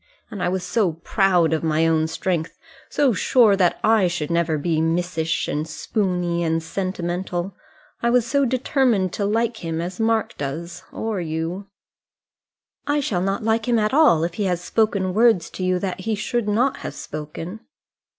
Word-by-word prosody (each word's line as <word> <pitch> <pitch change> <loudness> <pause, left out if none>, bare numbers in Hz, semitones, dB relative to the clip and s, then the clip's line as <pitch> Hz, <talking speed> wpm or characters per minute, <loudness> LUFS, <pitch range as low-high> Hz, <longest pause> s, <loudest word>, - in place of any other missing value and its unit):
And 200 - -6
I - - +1
was 185 0 -2
so 185 -2 +1
proud 175 -1 +2
of 160 - -1
my 160 0 +2
own 160 -1 +2
strength; 165 0 -2 0.3
so 275 -4 +2
sure 220 0 +4
that 180 -3 +2
I 215 -4 +4
should 170 -3 -3
never 170 -2 +1
be 160 +1 0
missish, 165 -1 0
and 150 +2 -2
spoony, 180 -1 -1
and 165 0 0
sentimental! 180 0 -3 0.5
I 235 - +2
was 245 -1 +3
so 280 +3 +1
determined 250 -6 +1
to 205 - -1
like 225 +2 0
him 165 -4 -4
as 180 +3 -5
Mark 225 0 +1
does, 155 +5 -5
or 220 -4 -3
you 165 +4 -4 0.6
" - - -53
"I 290 0 +2
shall 200 -10 -1
not 195 +3 -1
like 225 +1 +1
him 240 -1 +3
at 215 +2 +1
all 285 - +5
if 170 0 -2
he 200 +3 -2
has 180 -2 0
spoken 195 -1 0
words 220 -5 +3
to 185 - -5
you 185 0 +2
that 185 0 -3
he 220 +3 -1
should 215 +2 -2
not 250 +6 +1
have - - -7
spoken." 155 +6 -7
185 Hz, 180 wpm, -22 LUFS, 165-220 Hz, 0.6 s, all